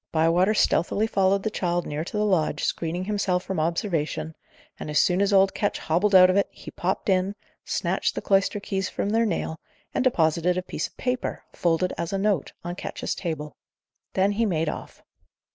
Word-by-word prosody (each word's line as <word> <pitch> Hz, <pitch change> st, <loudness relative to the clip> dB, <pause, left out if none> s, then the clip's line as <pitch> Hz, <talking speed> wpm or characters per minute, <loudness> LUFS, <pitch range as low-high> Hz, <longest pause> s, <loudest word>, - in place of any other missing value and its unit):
Bywater 170 Hz, +6 st, +3 dB
stealthily 205 Hz, +2 st, +2 dB
followed 195 Hz, -2 st, +2 dB
the 220 Hz, -, -1 dB
child 175 Hz, -3 st, -1 dB
near 150 Hz, +1 st, -3 dB
to 195 Hz, -, -5 dB
the 210 Hz, -, +2 dB
lodge, 160 Hz, -7 st, +1 dB
screening 170 Hz, +2 st, -1 dB
himself 190 Hz, -3 st, 0 dB
from 190 Hz, -4 st, -3 dB
observation; 160 Hz, -2 st, -1 dB, 0.5 s
and, -, -, -6 dB
as 150 Hz, -, 0 dB
soon 180 Hz, +4 st, +3 dB
as 200 Hz, 0 st, +2 dB
old 195 Hz, -1 st, +5 dB
Ketch 205 Hz, -, -1 dB
hobbled 190 Hz, +5 st, +1 dB
out 185 Hz, 0 st, +9 dB
of 185 Hz, -, +1 dB
it, 200 Hz, -, +3 dB
he -, -, -11 dB
popped 185 Hz, +2 st, -2 dB
in, 190 Hz, +1 st, +1 dB, 0.3 s
snatched -, -, -1 dB
the -, -, -3 dB
cloister 195 Hz, +1 st, +2 dB
keys 195 Hz, -1 st, -2 dB
from 200 Hz, -, -2 dB
their 225 Hz, +1 st, +3 dB
nail, 160 Hz, -4 st, -2 dB, 0.3 s
and -, -, +1 dB
deposited 175 Hz, -6 st, +2 dB
a 185 Hz, -, -1 dB
piece -, -, -3 dB
of -, -, -28 dB
paper, 250 Hz, -1 st, -2 dB
folded 175 Hz, +1 st, +1 dB
as 170 Hz, -, -2 dB
a 195 Hz, -, 0 dB
note, 195 Hz, -6 st, 0 dB
on 175 Hz, +1 st, -4 dB
Ketch's -, -, -4 dB
table. 155 Hz, -5 st, -5 dB, 0.6 s
Then 195 Hz, +1 st, +3 dB
he 215 Hz, +3 st, 0 dB
made 165 Hz, -4 st, 0 dB
off. -, -, -8 dB
185 Hz, 195 wpm, -25 LUFS, 165-200 Hz, 0.6 s, out